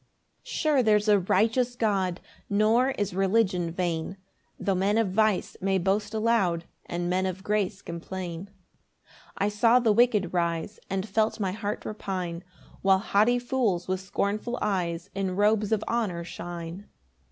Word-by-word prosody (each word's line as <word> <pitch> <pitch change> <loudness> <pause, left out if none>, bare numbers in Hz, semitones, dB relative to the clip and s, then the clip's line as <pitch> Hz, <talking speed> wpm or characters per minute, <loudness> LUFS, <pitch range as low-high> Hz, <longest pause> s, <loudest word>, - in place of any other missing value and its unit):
1 - - -44
Sure 300 -4 +1
there's 210 -2 +3
a 205 -1 +5
righteous 230 +7 +1
God, 195 -6 0 0.3
Nor 220 +5 +3
is 205 -3 -1
religion 190 -2 +1
vain, 170 +1 -2 0.4
Tho' 195 - 0
men 195 +3 +1
of 225 -5 +1
vice 215 0 +1
may 195 0 +2
boast 205 +4 0
aloud, 215 -7 +1 0.2
And 175 0 -2
men 185 +1 +1
of 190 +1 -5
grace 205 -2 -1
complain. 175 +1 -6
2 - - -26 0.9
I 200 - +1
saw 230 +4 +4
the 235 -3 +3
wicked 215 -5 +3
rise, 170 +3 -1
And 195 +1 -2
felt 220 +2 0
my 195 -3 0
heart 210 +1 -4
repine, 185 -5 -4 0.4
While 195 0 +5
haughty 215 +4 +2
fools 240 -8 0
with 185 0 -1
scornful 210 +5 -2
eyes 175 -2 -2
In 190 -1 -2
robes 210 +1 +2
of 215 -1 +1
honour 205 -8 -1
shine. 170 +2 -7
195 Hz, 150 wpm, -27 LUFS, 180-215 Hz, 0.9 s, a